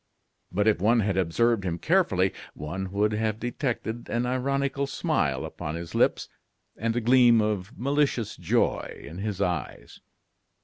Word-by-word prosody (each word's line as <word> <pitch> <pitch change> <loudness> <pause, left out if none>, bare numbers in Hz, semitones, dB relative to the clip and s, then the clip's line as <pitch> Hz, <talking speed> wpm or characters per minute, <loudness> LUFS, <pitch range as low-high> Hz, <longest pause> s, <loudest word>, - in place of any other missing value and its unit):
But 105 +4 +1
if 105 -5 +3
one 115 +3 +4
had 100 -2 0
observed 100 +5 +2
him 85 -2 -2
carefully, 100 - +2 0.2
one 90 +6 -5
would 105 +2 +1
have 110 0 -1
detected 120 -2 -3
an 120 +1 0
ironical 140 +2 0
smile 135 - 0
upon 75 - -5
his 85 0 -7
lips - - +2 0.5
and 115 +1 -1
a 120 - +1
gleam 120 0 +6
of 105 +1 -2
malicious 140 -3 0
joy - - 0
in 80 +6 -8
his 105 -2 -3
eyes. 85 -7 -4
110 Hz, 145 wpm, -26 LUFS, 95-125 Hz, 0.5 s, gleam